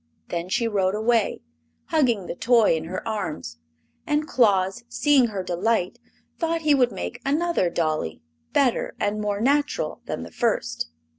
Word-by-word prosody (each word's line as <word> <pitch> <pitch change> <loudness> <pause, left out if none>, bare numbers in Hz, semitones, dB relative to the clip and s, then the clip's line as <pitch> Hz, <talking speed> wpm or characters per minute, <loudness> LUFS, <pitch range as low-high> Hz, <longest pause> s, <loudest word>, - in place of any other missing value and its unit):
Then 170 +1 -3
she 230 +4 +1
rode 195 -3 +1
away, 220 - +1 0.5
hugging 250 - +2
the - - -4
toy 225 0 +4
in 160 0 -4
her 185 +6 -5
arms, 155 - -4 0.5
and 300 0 +1
Claus, 200 -3 +2
seeing 285 -4 +4
her 200 -4 -4
delight, 180 +2 0 0.4
thought 330 0 0
he 305 -2 +4
would 250 -3 +3
make 90 0 -5
another 300 - +1
dolly, 155 - -2 0.3
better 260 -4 +1
and 210 +1 -1
more 205 -1 -1
natural 285 +5 0
than - - -4
the - - -10
first. 80 - -1
215 Hz, 150 wpm, -24 LUFS, 180-260 Hz, 0.5 s, toy